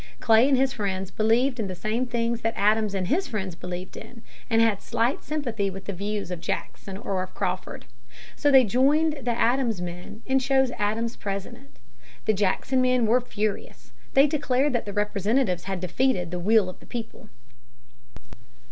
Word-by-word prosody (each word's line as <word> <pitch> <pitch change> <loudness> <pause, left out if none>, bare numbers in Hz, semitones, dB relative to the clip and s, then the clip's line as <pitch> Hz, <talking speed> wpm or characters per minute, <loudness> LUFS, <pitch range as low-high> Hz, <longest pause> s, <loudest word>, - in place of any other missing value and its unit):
Clay 225 +2 +5
and 270 - +4
his 265 +1 +2
friends 190 -2 -3
believed 240 +4 +2
in 215 - -1
the 185 - -5
same 220 +7 -1
things 235 -1 -1
that 225 0 -1
Adams 210 0 +2
and 185 -2 -1
his 340 - +1
friends 200 -7 -4
believed 180 +2 -7
in, 235 -2 -11 0.3
and 225 -1 +3
had 225 -3 +3
slight 235 +4 0
sympathy 240 -10 -2
with 195 0 -8
the 200 - -4
views 200 0 -4
of 175 -2 -5
Jackson 190 +2 -5
or 195 -4 -2
of 185 - -7
Crawford. - - -3 0.5
So 290 - +2
they 265 -2 +7
joined 285 +7 +2
the 250 - -3
Adams 240 -4 +2
men 180 +5 -7
and 265 0 +2
chose 265 -1 +2
Adams 225 +3 -1
President. 195 -8 -6 0.5
The 215 - +3
Jackson 210 +6 +1
men 255 -2 +3
were 240 +3 +3
furious. 215 -3 -4 0.2
They 275 +1 +7
declared 285 -2 +1
that 240 - -1
the 205 - -6
Representatives 205 -1 0
had 190 -1 -3
defeated 180 0 0
the 180 - -3
"will 210 +2 +3
of 185 - -8
the - - -17
people." 235 -2 -7
220 Hz, 175 wpm, -25 LUFS, 195-255 Hz, 0.5 s, they